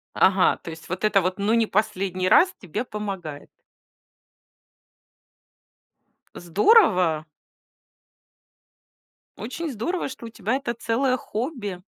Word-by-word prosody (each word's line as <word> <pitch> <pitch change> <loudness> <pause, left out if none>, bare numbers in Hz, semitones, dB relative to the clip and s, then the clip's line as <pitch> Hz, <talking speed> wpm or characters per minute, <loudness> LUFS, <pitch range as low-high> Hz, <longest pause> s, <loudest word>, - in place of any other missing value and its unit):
Ага, 190 -1 +4
то - - -10
есть, 160 0 -10
вот 185 +3 -4
это 210 -2 +4
вот, 185 +2 -2
"ну 210 +3 +1
не 230 -1 +3
последний 185 -3 -1
раз", 370 +1 +5
тебе 205 +5 -4
помогает? 195 - -6 2.9
Здорово. 180 - +3 2.1
Очень 280 - -5
здорово, 275 - -3
что 235 -3 -9
у - - -8
тебя 220 +3 -2
это 245 -4 -3
целое 255 +3 0
хобби. 215 - -5
210 Hz, 105 wpm, -24 LUFS, 185-245 Hz, 2.9 s, раз